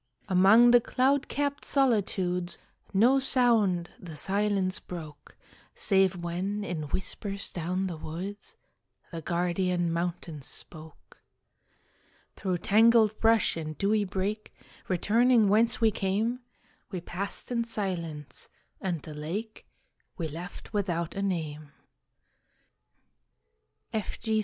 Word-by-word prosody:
Among 200 +6 +6
the 245 0 +7
cloud 270 +4 +1
capt 285 0 -2
solitudes, 190 -9 +1 0.3
No 240 +7 +4
sound 225 -10 +3
the 165 -4 -9
silence 195 +2 +1
broke, 155 -5 -10 0.4
Save 190 -2 +3
when, 180 +4 -3
in 160 -6 -4
whispers 200 +3 -2
down 180 +3 -2
the 175 -4 -4
woods, 185 +7 -7 0.6
The 165 -1 -5
guardian 175 0 0
mountains 170 -4 -4
spoke. 155 -2 -10 1.2
Through 185 -2 -1
tangled 220 +2 +4
brush 225 -2 +3
and 155 -2 -5
dewy 210 +1 +2
brake, 200 +3 -3 0.4
Returning 220 +4 +3
whence 225 +4 +3
we 225 -2 +4
came, 210 +6 -1 0.5
We 185 - -4
passed 190 +7 -4
in 235 -1 +1
silence, 170 -10 -4 0.3
and 175 -6 -2
the 155 - -8
lake 190 +9 -6 0.5
We 165 -4 -2
left 170 +7 -9
without 175 -5 -1
a 195 - -3
name. 155 -6 -3 2.2
F. 215 -2 -3
G. 220 -1 0
190 Hz, 110 wpm, -28 LUFS, 170-220 Hz, 2.2 s, the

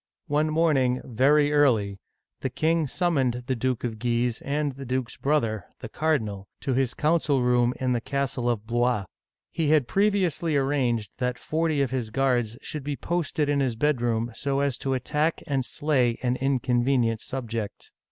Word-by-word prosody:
One 150 +2 +2
morning, 145 -6 +2
very 145 +5 +3
early, 110 -10 +3 0.4
the - - -2
king 160 -1 +1
summoned 135 -7 0
the 130 - -1
Duke 125 0 -1
of 115 -3 -3
Guise 120 0 0
and 145 +1 -1
the 135 +1 -9
duke's 130 -1 -2
brother, 115 -9 0
the - - -7
cardinal, 110 -11 -1
to 135 - -1
his 130 -1 0
coun 160 +3 +2
cil 140 -5 +1
room 125 0 +2
in 130 -1 +1
the 120 - 0
castle 130 -2 -1
of 110 -3 -1
Blois. 120 -2 +1 0.5
He 160 -3 0
had 150 -5 +4
previously 185 -6 +1
ar 135 - +2
ranged 120 -6 0
that 125 -1 -1
forty 155 -2 0
of 130 - -2
his 125 -4 -2
guards 120 -2 0
should 150 -2 -5
be 145 0 -2
posted 160 -2 -1
in 145 -1 +1
his 130 -4 0
bedroom 120 -3 0
so 140 +3 -1
as 140 -3 +1
to 135 -1 -1
attack 150 +5 0
and 135 -2 0
slay 130 -4 +1
an 125 0 +1
inconvenient 125 -3 +1
subject. 115 -5 -5
130 Hz, 170 wpm, -26 LUFS, 120-145 Hz, 0.5 s, had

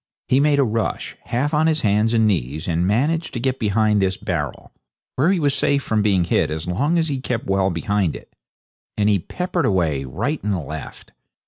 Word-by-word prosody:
He 130 - +4
made 145 0 +3
a 140 - +4
rush, 115 -2 -2
half 140 +6 -1
on 155 +1 +3
his 155 -1 +1
hands 105 +2 +2
and 110 -1 +4
knees, 80 - -1
and 85 +1 +1
managed 150 - 0
to - - -1
get 130 +1 -1
behind 105 -1 +2
this 95 0 0
barrel, - - -4 0.4
where 155 +8 +3
he 190 - +1
was 145 -3 +2
safe 140 0 +1
from 110 -1 0
being 100 -4 +2
hit 85 - +1
as 80 +1 -4
long 140 - 0
as 165 -1 +1
he 140 -3 -2
kept 125 -3 -3
well 95 0 +1
behind 95 0 -1
it. - - -13 0.6
Then 105 -1 +2
he 100 -2 +3
peppered 180 - -2
away, 80 -8 +1
right 110 - -3
and 100 -2 0
left. 80 -1 -8
110 Hz, 205 wpm, -21 LUFS, 95-140 Hz, 0.6 s, He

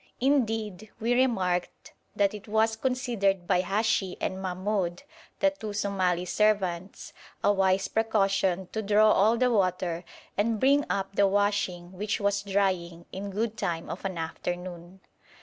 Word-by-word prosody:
Indeed, 225 -7 0
we 230 +2 +1
remarked 190 -9 0 0.2
that 200 0 +2
it 210 0 -9
was 220 +1 +2
considered 225 -7 0
by 180 0 +2
Hashi 195 0 0
and 190 0 -3
Mahmoud, 185 0 -2 0.4
the 290 - +4
two 220 -8 -7
Somali 190 -4 0
servants, 190 -2 0 0.3
a 205 - +4
wise 190 -1 +2
precaution 195 -4 +1
to 220 - -2
draw 215 +1 +4
all 220 +4 +4
the 250 +1 +2
water 180 -4 0 0.3
and 215 +1 +1
bring 280 +3 +4
up 195 0 -2
the 200 -1 +4
washing, 195 -3 0
which 205 +3 -2
was 200 0 +1
drying, 185 -4 -1
in 200 +2 -5
good 215 +3 -2
time 175 -6 -3
of 180 - -7
an 190 -3 -3
afternoon. 175 +2 -5
200 Hz, 145 wpm, -28 LUFS, 185-220 Hz, 0.4 s, the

